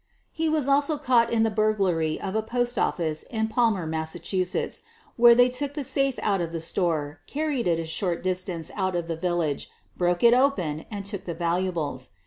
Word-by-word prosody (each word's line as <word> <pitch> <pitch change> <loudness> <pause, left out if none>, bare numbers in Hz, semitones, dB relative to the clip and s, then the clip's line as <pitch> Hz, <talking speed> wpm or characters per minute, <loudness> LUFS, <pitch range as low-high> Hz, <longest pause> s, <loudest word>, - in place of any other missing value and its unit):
He 320 0 -1
was 305 -3 +1
also 285 +2 +2
caught 245 -5 +3
in 225 -1 +3
the 225 - +1
burglary 195 -7 +1
of 190 - -4
a 220 - +1
post 240 +2 -1
office 155 -3 -1
at 220 -1 -1
Palmer, 220 -7 +2
Massachusetts, 160 +4 -2 0.3
where 235 0 +7
they 245 +1 +6
took 275 +3 -4
the 295 - -3
safe 275 0 0
out 195 -3 +1
of 165 -1 -3
the 165 - -3
store, 160 -3 -1
carried 290 -6 -1
it 165 -1 +2
a 165 - -3
short 170 +2 -2
distance 185 -2 -3
out 190 -2 -1
of 170 -1 -2
the 165 - -2
village, 165 -3 -1 0.3
broke 175 +1 0
it 235 0 +7
open, 185 - +1
and 200 -2 -6
took 200 -2 -5
the 170 - -4
valuables. 170 -6 -2
190 Hz, 190 wpm, -26 LUFS, 170-240 Hz, 0.3 s, where